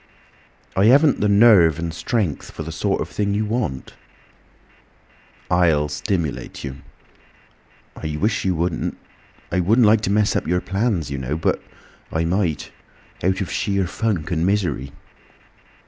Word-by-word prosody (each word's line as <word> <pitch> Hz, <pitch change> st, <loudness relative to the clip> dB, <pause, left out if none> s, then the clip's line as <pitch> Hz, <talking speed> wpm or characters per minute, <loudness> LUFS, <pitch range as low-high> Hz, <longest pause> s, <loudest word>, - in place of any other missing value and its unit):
"I 95 Hz, +2 st, +3 dB
haven't 140 Hz, +5 st, +5 dB
the 105 Hz, -, +2 dB
nerve 100 Hz, -7 st, +6 dB
and 85 Hz, 0 st, -4 dB
strength 90 Hz, -, -2 dB
for 80 Hz, -, -7 dB
the 80 Hz, -, -6 dB
sort 80 Hz, -, -1 dB
of -, -, -3 dB
thing 100 Hz, -1 st, -1 dB
you 105 Hz, +1 st, 0 dB
want." 105 Hz, -, -3 dB, 1.6 s
"I'll 80 Hz, -4 st, +3 dB
stimulate 85 Hz, -7 st, -3 dB
you." 70 Hz, -1 st, -6 dB, 1.2 s
"I 75 Hz, -1 st, -4 dB
wish 105 Hz, +2 st, 0 dB
you 95 Hz, -2 st, +1 dB
wouldn't. 85 Hz, +1 st, -2 dB, 0.5 s
I 90 Hz, -, +1 dB
wouldn't 110 Hz, +7 st, +4 dB
like 105 Hz, 0 st, +5 dB
to 105 Hz, -, -1 dB
mess 105 Hz, +1 st, +2 dB
up -, -, -1 dB
your 90 Hz, +2 st, +2 dB
plans, 95 Hz, -, -1 dB
you 70 Hz, -, -3 dB
know. 65 Hz, +4 st, -3 dB
But 80 Hz, -, 0 dB, 0.5 s
I 80 Hz, +1 st, 0 dB
might—out 95 Hz, +1 st, -3 dB
of 95 Hz, -, -3 dB
sheer 100 Hz, -1 st, 0 dB
funk 90 Hz, -3 st, -2 dB
and 85 Hz, -1 st, 0 dB
misery." 85 Hz, -9 st, 0 dB
90 Hz, 145 wpm, -21 LUFS, 80-105 Hz, 1.6 s, nerve